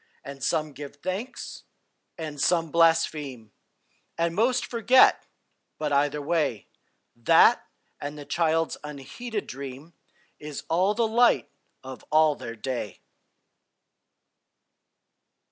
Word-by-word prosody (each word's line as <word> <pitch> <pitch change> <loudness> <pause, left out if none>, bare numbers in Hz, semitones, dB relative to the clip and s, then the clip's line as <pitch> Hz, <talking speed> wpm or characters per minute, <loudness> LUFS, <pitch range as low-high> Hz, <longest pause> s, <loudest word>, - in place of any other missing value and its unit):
And 140 0 -9 0.3
give 145 0 -8
some 145 - -38
thanks, 200 +8 -5 0.5
and 155 -4 -5
some 165 -3 +2
blaspheme, 155 -8 +1 0.7
And 170 0 0
most 240 +7 +1
forget, 245 +2 +4 0.5
but, 150 -2 -2
either 145 +1 +2
way, 145 -9 -1 0.5
That 120 -1 +4 0.3
and 145 +1 -6
the 145 - -9
child's 165 0 0
unheeded 150 - -6
dream 140 +4 -9 0.5
Is 150 -1 -7
all 185 +5 +2
the 230 0 +2
light 235 +2 +3 0.3
of 130 0 -9
all 155 0 +5
their 115 -4 -8
day. 120 -2 -5
155 Hz, 105 wpm, -26 LUFS, 140-180 Hz, 0.7 s, all